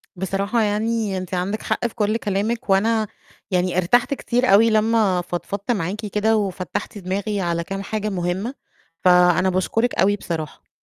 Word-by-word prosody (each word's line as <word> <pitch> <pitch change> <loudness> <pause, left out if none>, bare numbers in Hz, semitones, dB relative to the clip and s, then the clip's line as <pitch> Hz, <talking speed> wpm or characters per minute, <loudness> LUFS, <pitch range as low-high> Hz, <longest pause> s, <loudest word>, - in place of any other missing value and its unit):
بصراحة 195 +5 -1
يعني 215 -1 0
أنتِ 185 0 -6
عندِك 185 +4 -1
حق 240 - 0
في 230 - -13
كُلّ 215 0 +1
كلامِك، 210 +2 -2
وأنا 215 +3 +2 0.4
يعني 180 -1 +1
ارتحت 240 +9 +3
كتير 245 -2 0
أوي 225 +3 +6
لمّا 215 -4 +2
فضفضت 190 +5 -4
معاكِ 205 +1 -2
كده 215 +2 +1
وفتّحتِ 195 +2 -3
دماغي 200 +2 -2
على 170 -1 -1
كام 195 +3 -5
حاجة 215 +1 -3
مهمة، 190 +5 -2 0.5
فأنا 180 0 +5
باشكرِك 205 +6 0
أوي 200 +3 +3
بصراحة. 160 -6 -6
200 Hz, 150 wpm, -22 LUFS, 185-220 Hz, 0.5 s, أوي